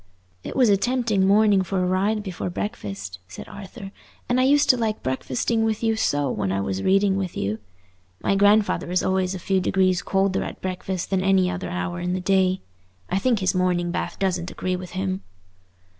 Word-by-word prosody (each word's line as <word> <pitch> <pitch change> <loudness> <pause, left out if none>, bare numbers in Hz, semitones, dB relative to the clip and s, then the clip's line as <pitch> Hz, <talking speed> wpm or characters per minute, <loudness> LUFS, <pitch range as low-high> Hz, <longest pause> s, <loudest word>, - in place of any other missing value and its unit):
"It - - -6
was 255 -3 +4
a 200 - +5
tempting 225 -4 +1
morning 205 -1 +5
for 185 0 -1
a - - +1
ride 200 +4 +1
before 185 -2 -4
breakfast," 100 - -5
said 95 - -9
Arthur; 195 0 -9 0.4
"and 245 +1 +2
I 255 - +4
used 290 +2 +4
to - - 0
like 220 -2 -2
breakfasting 130 - -1
with 220 0 -1
you 225 -1 +2
so 145 -10 0
when 95 - -1
I 100 - 0
was 95 -1 -2
reading 195 - +3
with 190 -3 -3
you. 105 +3 -2 0.6
My - - +1
grandfather 205 -1 +3
is 180 0 +1
always 190 0 0
a - - -3
few 190 +1 0
degrees 185 0 +2
colder 195 0 +1
at - - -7
breakfast 185 0 -4
than 190 -1 +2
at 190 - -1
any 185 -2 +3
other 180 0 -4
hour 175 0 -3
in 180 +1 -2
the 185 - -1
day. 185 0 +2 0.5
I 190 - +2
think 235 -1 +1
his 185 0 +2
morning 180 -1 +1
bath - - -3
doesn't 180 -2 -1
agree 185 0 -2
with 180 0 -8
him." 95 0 -2
190 Hz, 205 wpm, -24 LUFS, 180-205 Hz, 0.6 s, a